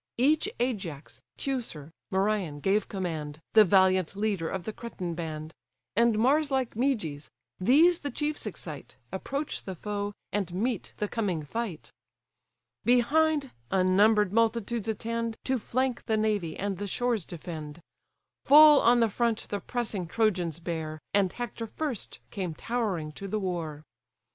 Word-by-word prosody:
Each 295 +6 +3
Ajax, 190 - -3 0.2
Teucer, 230 - -4 0.2
Merion 190 -6 0
gave 195 +6 +1
command, 160 -6 -4
The 220 - +9
valiant 190 -2 +3
leader 200 -5 -1
of 190 -2 -3
the 220 - -5
Cretan 185 -8 -5
band; 160 -1 -5 0.4
And 230 0 +4
Mars 280 +6 +3
like 265 -3 0
Meges: 210 - -1 0.3
these 315 - +5
the 285 - -4
chiefs 295 -4 -2
excite, 160 -7 -7 0.2
Approach 275 +10 -3
the 190 - -5
foe, 205 +3 -3 0.2
and 195 -4 -1
meet 225 +2 -2
the 210 - -1
coming 195 -9 -1
fight. 195 +1 -5 0.9
Behind, 280 +4 +3 0.2
unnumber'd 195 +2 +4
multitudes 230 -1 +1
attend, 230 +1 -2
To 260 -1 0
flank 255 +2 -1
the 220 - +2
navy, 210 -7 0
and 195 -2 -2
the 205 - -3
shores 240 0 0
defend. 155 -2 -7 0.7
Full 300 0 +9
on 240 +1 +5
the 230 - +5
front 230 +1 -1
the 205 - -2
pressing 215 -8 -3
Trojans 180 -6 0
bear, 160 -2 -4 0.2
And 195 -3 +3
Hector 240 -1 -5
first 275 -2 -4
came 180 -5 -3
towering 200 -9 -2
to 195 +6 -7
the 215 +2 -1
war. 165 -6 -3
210 Hz, 140 wpm, -28 LUFS, 175-240 Hz, 0.9 s, The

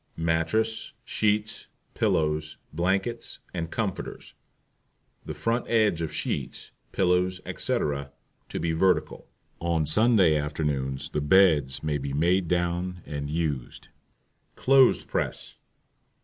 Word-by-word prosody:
MATTRESS, 85 +8 0
SHEETS, 105 0 0 0.3
PILLOWS, 75 0 0 0.2
BLANKETS, 95 +8 -1 0.2
and 85 -2 -3
COMFORTERS, 105 -3 -4 0.9
the - - -6
front 115 +1 -1
edge 110 -7 +3
of 80 - -3
sheets, - - -4 0.2
pillows, 90 0 +1
etc., 70 -1 -1 0.4
to - - -4
be 85 - 0
vertical. 90 +3 +1 0.3
On 85 -2 0
Sunday 95 0 +5
afternoons 75 -3 -2
the 75 - -2
BEDS 75 -5 +4
may 75 -1 -1
be 70 0 -4
made 85 +5 +2
down 90 +1 -1
and 70 -1 -5
used. 75 -5 -3 0.7
CLOTHES 135 -1 +5
PRESS. - - -3
85 Hz, 105 wpm, -26 LUFS, 75-95 Hz, 0.9 s, Sunday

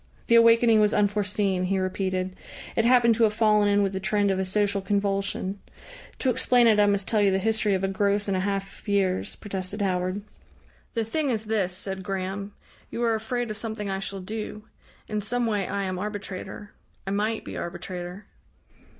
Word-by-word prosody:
The - - +2
awakening 230 -1 +6
was 210 0 +3
unforeseen, 205 -2 +1
he 195 +1 0
repeated; 185 0 -2 0.4
it 225 - +2
happened 240 -1 +5
to 230 +1 +2
have 210 -1 0
fallen 210 -2 +4
in 205 0 +3
with 195 -1 -1
the 190 - -2
trend 205 0 +1
of 190 - 0
a 190 - 0
social 200 +1 +1
convulsion. 200 -1 -1 0.6
"To 260 - +1
explain 245 0 +4
it 220 -2 +5
I 205 - +5
must 200 -1 +1
tell 215 -2 +2
you 200 - +5
the 190 - +2
history 215 0 +1
of 190 - -2
a - - +2
gross 200 +1 +1
and 195 - +1
a - - +1
half 195 0 -3
of - - -21
years," 195 -2 0
protested 195 0 -5
Howard. 185 +1 -1 0.7
"The 225 -1 0
thing 290 +5 -1
is 220 -3 -1
this," 195 -4 -1
said 190 -1 -5
Graham. 195 +1 -4 0.4
"You 240 - -3
are 230 -1 +3
afraid 225 +1 -2
of 215 - -5
something 220 -2 -4
I 195 - -2
shall 195 0 -5
do. 210 +2 -6 0.4
In 210 -1 -2
some 245 +3 -1
way 210 -4 0
I 200 - -2
am 185 -1 -3
arbitrator 205 0 -6 0.3
I 195 - -3
might 215 +2 -1
be - - -7
arbitrator." 180 +2 -6
205 Hz, 195 wpm, -26 LUFS, 190-215 Hz, 0.7 s, awakening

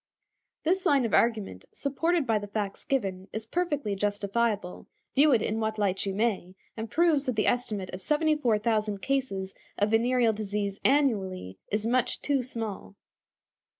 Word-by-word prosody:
This 370 +4 +1
line 275 -4 +4
of 225 - -3
argument, 215 - +1
supported 320 +3 0
by 225 -3 +2
the 205 - -7
facts 205 -1 -4
given, 195 -8 -2
is 220 0 -4
perfectly 290 - -1
justifiable, 205 0 -1 0.3
view 295 +2 +5
it 235 -5 +3
in 220 +1 -1
what 220 0 -1
light 200 -1 0
you 195 - -2
may, 200 -4 -1 0.2
and 225 0 -5
proves 320 -3 +2
that 255 - 0
the 215 - +1
estimate 215 -6 -1
of 185 - -6
74,000 230 - +1
cases 195 -7 -2 0.2
of 205 +1 +1
venereal 235 0 +3
disease 205 -1 -3
annually 195 - +1
is 210 +1 0
much 245 +2 +1
too 280 -2 +1
small. 225 -5 -5
220 Hz, 150 wpm, -28 LUFS, 200-265 Hz, 0.3 s, view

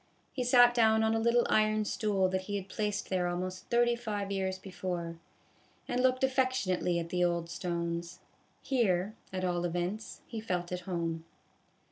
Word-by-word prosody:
He 255 - -1
sat 245 0 +6
down 220 -2 +4
on 220 0 +2
a 225 - +1
little 235 +1 +3
iron 215 0 +3
stool 200 -3 +1
that 190 0 -1
he 205 - -3
had 195 -1 -4
placed 210 0 -2
there 180 -1 +1
almost 185 +1 -4
thirty 240 0 +3
five 210 -4 -4
years 190 -1 -1
before, 180 -3 -5 0.7
and 250 - 0
looked 255 0 +2
affection 255 -7 +2
ately 175 -1 0
at 165 0 -5
the 180 0 +1
old 170 -1 0
stones. 170 -1 -3 0.5
Here, 215 -6 +1 0.2
at 185 -1 -2
all 175 -1 0
events, 175 +5 -3
he 225 -2 -6
felt 180 -5 -2
at 180 - -2
home. 165 -2 -2
190 Hz, 170 wpm, -31 LUFS, 175-225 Hz, 0.7 s, sat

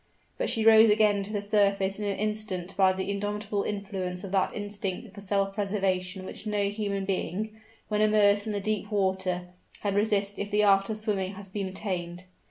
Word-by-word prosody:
But - - 0
she 220 -1 0
rose 220 0 +8
again 210 -1 +4
to 195 +2 -6
the 205 -2 -2
surface 200 -1 +2
in 210 - -2
an 200 -1 -1
instant 210 -4 -3
by 190 -1 +5
the 190 +1 -3
indomitable 205 0 -2
influence 195 -3 -3
of 195 - -6
that 195 -1 +2
instinct 205 0 -4
for 200 - -10
self 195 0 0
preservation 190 -2 -1
which 215 - -8
no 205 -1 +1
human 200 -2 -2
being, 195 +2 -2 0.4
when 210 -1 0
immersed 210 -1 +4
in 215 - -2
the 205 - -1
deep 205 0 -2
water, 190 -3 0 0.3
can 200 -1 -1
resist 205 -1 +1
if 205 - -3
the 210 0 +2
art 195 0 +4
of 215 - -1
swimming 205 -3 -1
has 195 0 -9
been 195 0 -3
attained. 180 -2 -4
200 Hz, 190 wpm, -28 LUFS, 190-210 Hz, 0.4 s, rose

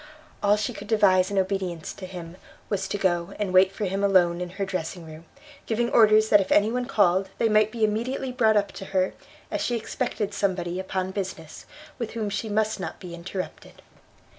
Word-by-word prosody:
All 205 0 +4
she 230 +4 -2
could 205 -1 -9
devise 190 -4 +4
in 200 - -3
obedience 185 -4 -1
to 185 - -9
him, 175 -1 -9 0.3
was 195 -2 -1
to 205 - -2
go 180 -1 0
and 205 -3 -2
wait 185 +1 +6
for 205 +2 -3
him 195 +1 -2
alone 180 -3 +3
in 180 - -3
her 200 - 0
dressing 180 -2 -4
room, 160 +1 -11 0.4
giving 235 +1 0
orders 215 -1 +5
that 205 - +6
if 190 - -4
any 210 +2 +4
one 250 0 -2
called 195 -5 +2
they 230 - +2
might 215 0 +3
be 230 -1 -2
immediately 235 +5 -1
brought 220 -4 +3
up 200 -1 +1
to 195 - -8
her, 185 0 +2 0.4
as - - -1
she 240 - 0
expected 225 -3 -3
somebody 185 -3 -1
upon 190 0 -3
business, 185 -5 -6 0.3
with 235 -3 -4
whom 215 -3 -3
she 205 +2 -3
must 215 0 0
not 190 - -6
be 180 -2 -9
interrupted. 180 +2 -7
195 Hz, 200 wpm, -25 LUFS, 185-215 Hz, 0.4 s, wait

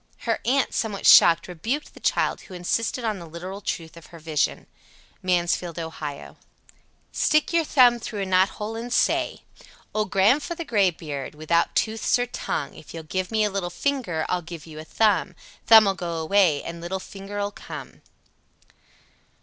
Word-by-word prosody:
Her 230 -2 -1
aunt, 265 +3 +1
somewhat 210 -3 -2
shocked, 165 0 +7
rebuked 225 - -4
the - - -14
child, - - 0
who 185 - -12
insisted 230 +7 -1
on 215 -3 -1
the 170 - -10
literal 180 +5 -7
truth 165 -4 -4
of 170 - -13
her 170 - -13
vision. 155 -2 -1 0.6
Mansfield, 175 -1 0
O. 165 -1 -4
87. 150 -3 -8 0.7
Stick 305 +3 +1
your 335 -1 +3
thumb 250 -5 +5
through 210 -3 -4
a - - -2
knothole 190 +4 +1
and 235 +2 -6
say: - - +1 0.5
Old 215 -1 -1
Gran'f'ther 280 - +2
Graybeard, 165 - -1
without 155 +2 0
tooths 220 +2 +1
or 245 - 0
tongue, 155 - -4
If 160 - -12
you'll 165 - -6
give 185 +4 -3
me 220 -1 +1
a 210 - 0
little 190 -3 -2
finger 185 - -2
I'll 180 - -1
give 170 -2 -9
you 155 -2 -10
a - - -7
thumb. 195 0 +1 0.3
Thumb'll 220 -3 +8
go 175 -3 -4
away 160 -2 +2
and 170 0 -7
little 185 +3 -3
finger'll 200 +1 -5
come. - - -10
190 Hz, 165 wpm, -24 LUFS, 170-220 Hz, 0.7 s, Thumb'll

